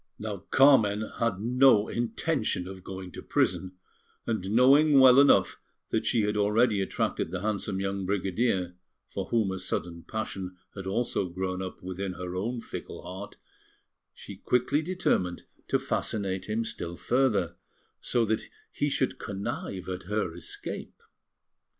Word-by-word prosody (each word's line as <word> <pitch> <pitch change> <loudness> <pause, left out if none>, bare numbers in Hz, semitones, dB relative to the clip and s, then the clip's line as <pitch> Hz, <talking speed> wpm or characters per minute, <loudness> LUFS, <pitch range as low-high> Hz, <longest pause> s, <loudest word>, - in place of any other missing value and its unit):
Now 105 -1 -4
Carmen 110 -6 +5
had 115 -5 0
no 120 -1 +5
intention 115 - -1
of 95 -1 -9
going 95 -1 -7
to - - -8
prison; 95 -1 0 0.5
and 110 -5 -2
knowing 135 +6 +6
well 130 0 +8
enough 140 - +4 0.3
that - - 0
she 115 - +3
had 105 +1 0
already 105 +1 +3
attracted 95 - -1
the 90 +1 -4
handsome 100 -2 -2
young 100 -1 -2
brigadier, 95 -1 0 0.4
for - - -3
whom 110 -5 +1
a 95 - -4
sudden 85 -2 -3
passion 95 -3 -5 0.2
had 95 -2 -7
also 100 -2 0
grown 95 +1 -3
up 95 -1 -7
within 95 +1 -4
her 90 0 -6
own 115 +6 -2
fickle - - -8
heart, 95 +3 -8 0.8
she - - -10
quickly 125 +4 +1
determined 155 - 0 0.2
to - - +2
fascinate 95 -2 -2
him 115 +2 0
still 85 -4 -4
further, 120 -9 +1 0.4
so 120 -2 +1
that 110 0 -1 0.2
he 145 - 0
should 130 -1 0
connive 95 -1 -4
at 95 -1 -5
her 105 -3 -1
escape. 85 -3 -6
100 Hz, 145 wpm, -28 LUFS, 95-120 Hz, 0.8 s, well